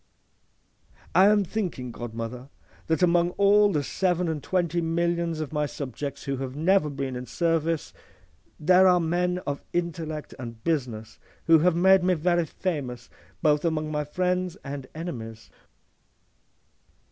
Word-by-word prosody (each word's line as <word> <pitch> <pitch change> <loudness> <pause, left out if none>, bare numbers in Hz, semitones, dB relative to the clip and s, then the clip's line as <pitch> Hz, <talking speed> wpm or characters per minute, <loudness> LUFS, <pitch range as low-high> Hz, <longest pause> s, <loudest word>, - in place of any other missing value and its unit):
'—'I 190 +2 +6
am 210 -1 +4
thinking, 175 - -4
godmother,' 120 +2 -6
says - - -35
he, - - -28
'that 160 +3 +1
among 175 0 +4
all 205 +1 +5
the 150 -5 0
seven 180 +3 0
and 160 -2 -2
twenty 175 -1 0
millions 170 0 0
of 155 -1 -5
my 150 -1 0
subjects 140 0 -6
who 140 -1 -2
have 130 0 -5
never 165 +1 +3
been 135 -2 -4
in 125 0 -6
service, 165 +3 0 0.7
there 185 +4 +5
are 180 -1 +5
men 175 +2 0
of 145 0 -3
intellect 165 -3 -3
and 115 -3 -8
business 120 -9 -2 0.3
who 165 -1 +6
have 175 +2 +3
made 190 +1 +5
me 180 0 +3
very 175 +1 +1
famous 135 -10 -4 0.3
both 150 -1 +3
among 155 -2 -1
my 150 -1 -1
friends 180 +3 -1
and 140 -1 -6
enemies. 115 -9 -7
160 Hz, 145 wpm, -26 LUFS, 140-180 Hz, 0.7 s, I